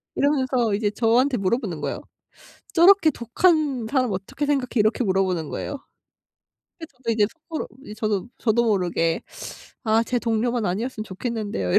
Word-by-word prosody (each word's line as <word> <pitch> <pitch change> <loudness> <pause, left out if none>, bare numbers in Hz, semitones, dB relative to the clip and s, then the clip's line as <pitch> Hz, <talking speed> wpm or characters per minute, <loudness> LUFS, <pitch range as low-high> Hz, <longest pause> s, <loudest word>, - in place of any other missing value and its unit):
이러면서 260 -6 +1
이제 205 0 0
저한테 240 +5 +2
물어보는 205 +7 -1
거예요. - - -3 0.7
"저렇게 345 -1 +6
독한 275 -1 +1
사람 255 -5 +1
어떻게 195 +10 -3
생각해?" 280 -3 +1
이렇게 215 +4 +2
물어보는 185 -5 0
거예요. 285 - -4 1.0
그죠. 320 -6 -11
저 230 - +2
이제 215 -2 +3 0.2
속으로 320 - -3 0.2
이 210 - -8
저도 215 -1 -1
저도 235 +1 +2
모르게 175 -6 +1 0.6
"아 220 0 +3
제 245 +1 -1
동료만 235 0 0
아니었으면 215 +4 -2
좋겠는데요." 205 - -3
이랬 - - +7
230 Hz, 365 characters per minute, -23 LUFS, 205-260 Hz, 1.0 s, 이랬